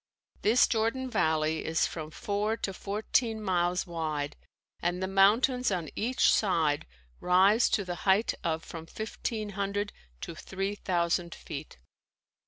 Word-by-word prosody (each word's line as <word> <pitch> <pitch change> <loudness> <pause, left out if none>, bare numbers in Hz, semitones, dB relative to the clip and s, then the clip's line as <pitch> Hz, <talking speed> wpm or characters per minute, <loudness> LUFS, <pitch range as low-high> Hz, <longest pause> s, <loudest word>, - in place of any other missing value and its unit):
This 230 +4 +5
Jordan 240 +3 0
valley 155 -2 +1
is 160 0 +1
from 155 -2 -5
four 210 +4 -1
to 195 - -3
fourteen 220 +4 0
miles 180 -3 0
wide 155 -4 -3 0.4
and 175 +1 0
the 190 - -1
mountains 220 +7 +4
on 170 -5 -2
each 245 +4 +3
side 160 - +1 0.3
rise 190 +6 +4
to 200 - +1
the 180 - -3
height 200 +3 +3
of 160 -1 -1
from 165 -1 -8
fifteen 220 0 -4
hundred 200 +1 -2 0.3
to - - -5
three 195 +4 -3
thousand 170 -3 -1
feet. - - -8
195 Hz, 135 wpm, -29 LUFS, 170-215 Hz, 0.4 s, This